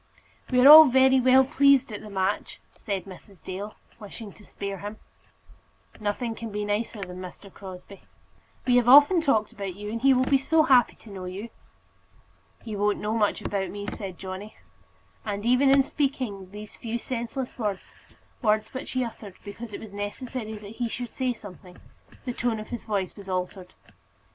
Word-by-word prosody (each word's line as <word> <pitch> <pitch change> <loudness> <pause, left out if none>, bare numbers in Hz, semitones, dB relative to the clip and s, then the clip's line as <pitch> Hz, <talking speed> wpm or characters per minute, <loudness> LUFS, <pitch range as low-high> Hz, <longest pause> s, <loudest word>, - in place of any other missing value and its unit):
"We 250 - +2
are 255 - +7
all 310 +2 +12
very 265 +1 +5
well 260 +1 +5
pleased 275 -2 +4
at 210 - -6
the 215 - -10
match," 195 +1 -2 0.2
said 195 -3 -4
Mrs. 190 -1 -14
Dale, 200 +3 -6 0.2
wishing 210 -1 -9
to 210 - -18
spare 200 -1 -6
him. 205 +2 -7 1.0
"Nothing 215 +3 -2
can 225 0 -7
be 210 0 -3
nicer 210 0 -2
than 180 -1 -8
Mr. 185 +1 -10
Crosbie," 190 0 -10
said - - -25
Bell. - - -29 0.6
"We 250 -1 +3
have 245 -1 +3
often 290 +6 +8
talked 220 -9 +1
about 195 -3 -6
you, 210 +1 -6
and 230 0 -4
he 270 0 +5
will 255 +1 +2
be 275 +1 +3
so 315 +4 +3
happy 255 -5 +4
to 220 - -15
know 190 -2 -7
you." 195 +6 -7 1.1
"He 220 -2 -6
won't 205 0 +1
know 210 +1 -2
much 210 -2 0
about 195 -2 -2
me," 205 0 -6
said 190 -4 -7
Johnny; 190 +3 -8 0.7
and 205 0 -4
even 250 +3 +4
in 275 0 +6
speaking 255 -10 -3
these 210 +1 -10
few 230 0 -4
senseless 245 +2 -5
words 205 -4 -3 0.5
words 215 -2 +1
which 260 - -6
he 255 -1 +1
uttered 215 -5 -8
because 220 +3 -8
it - - -6
was 215 -2 -11
necessary 220 +2 -5
that 210 +1 -11
he 240 -2 -1
should 245 +1 -6
say 255 -1 -1
something 190 -5 -11 0.5
the 250 - -3
tone 235 -2 -1
of 215 - -9
his 240 - -6
voice 200 -4 -2
was 200 -2 -11
altered. 185 0 -4
215 Hz, 185 wpm, -26 LUFS, 200-250 Hz, 1.1 s, all